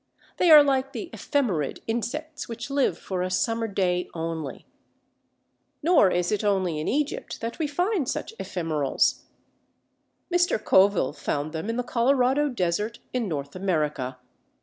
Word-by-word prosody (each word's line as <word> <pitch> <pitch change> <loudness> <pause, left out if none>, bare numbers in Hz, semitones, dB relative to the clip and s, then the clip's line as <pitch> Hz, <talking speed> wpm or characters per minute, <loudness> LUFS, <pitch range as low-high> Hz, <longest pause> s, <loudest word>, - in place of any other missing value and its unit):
They 355 - +3
are 305 -2 +10
like 270 -1 0
the 350 - -6
Ephemerid 200 - -1
insects 295 +7 -4
which 235 +3 -6
live 275 -11 +1
for 185 0 -4
a 185 - -1
summer 225 +4 0
day 180 -3 0
only. 160 -3 -4 1.2
Nor 325 - +5
is 175 +1 0
it 210 0 0
only 190 -6 +1
in 155 - -3
Egypt 300 - -2
that 230 +5 -5
we 315 - 0
find 355 - 0
such 445 - -3
ephemerals. 155 -6 0 1.1
Mr. 350 0 +3
Coville 190 -8 +3
found 145 0 -3
them 160 +7 -4
in 230 - -2
the 250 - 0
Colorado 260 +4 +2
desert 210 0 -1 0.2
in 245 -4 -1
North 140 -3 -4
America. 150 -9 -1
220 Hz, 145 wpm, -26 LUFS, 175-275 Hz, 1.2 s, are